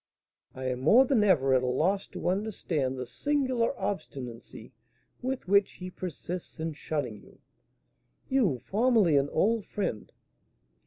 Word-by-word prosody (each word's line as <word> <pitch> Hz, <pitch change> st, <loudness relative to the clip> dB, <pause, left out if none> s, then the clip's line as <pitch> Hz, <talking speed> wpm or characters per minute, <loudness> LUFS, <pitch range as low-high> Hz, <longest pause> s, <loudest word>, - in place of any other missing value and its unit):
"I 130 Hz, -, -6 dB
am 125 Hz, -1 st, -1 dB
more 220 Hz, -, +6 dB
than 255 Hz, -5 st, +3 dB
ever 140 Hz, -10 st, +4 dB
at 130 Hz, -, +4 dB
a 125 Hz, -, -1 dB
loss 180 Hz, +10 st, +1 dB
to -, -, -5 dB
understand 180 Hz, -9 st, -1 dB
the 125 Hz, -, -4 dB
singular 255 Hz, -, 0 dB
obstinacy 125 Hz, -, -6 dB, 0.5 s
with 260 Hz, -4 st, -3 dB
which 200 Hz, +1 st, +3 dB
he 185 Hz, 0 st, -8 dB
persists 180 Hz, -1 st, -6 dB
in 160 Hz, 0 st, -2 dB
shunning 150 Hz, 0 st, -4 dB
you, -, -, -19 dB, 0.9 s
you, 235 Hz, -, +2 dB
formerly 215 Hz, -, +3 dB
an 140 Hz, +1 st, +2 dB
old 225 Hz, +1 st, +1 dB
friend. 115 Hz, -, -3 dB
180 Hz, 140 wpm, -29 LUFS, 135-220 Hz, 0.9 s, more